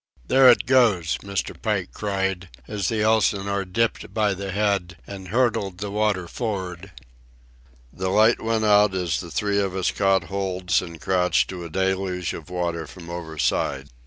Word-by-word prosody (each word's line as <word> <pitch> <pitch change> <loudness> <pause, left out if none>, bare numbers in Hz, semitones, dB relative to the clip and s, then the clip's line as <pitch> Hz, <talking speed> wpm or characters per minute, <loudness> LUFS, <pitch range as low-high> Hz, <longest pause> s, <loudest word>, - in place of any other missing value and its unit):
"There 130 0 +7
it 120 - +5
goes!" 115 -11 +3
Mr. 100 -1 -4
Pike - - -1
cried, 95 -3 -2 0.2
as 100 -4 -2
the 110 -2 0
Elsinore 100 -2 +1
dipped 115 +5 -1
by 105 -2 +2
the 100 +1 -5
head 100 -4 0
and 95 -2 -9
hurtled 115 -4 0
the 100 +1 -5
water 105 -4 0
for'ard. 95 -4 -4 1.0
The 95 0 -3
light 110 +4 +4
went 110 -1 0
out 105 -2 +4
as 90 -3 -1
the 85 - -7
three 100 +4 0
of 95 -2 -1
us 95 -1 0
caught 95 -2 +2
holds 95 -1 -1
and 85 -2 -9
crouched 90 +2 +1
to 90 -2 -6
a - - -7
deluge 95 0 -1
of 80 - -9
water 85 -2 -3
from 85 -2 -11
overside. 75 -4 -2
95 Hz, 160 wpm, -23 LUFS, 90-105 Hz, 1.0 s, There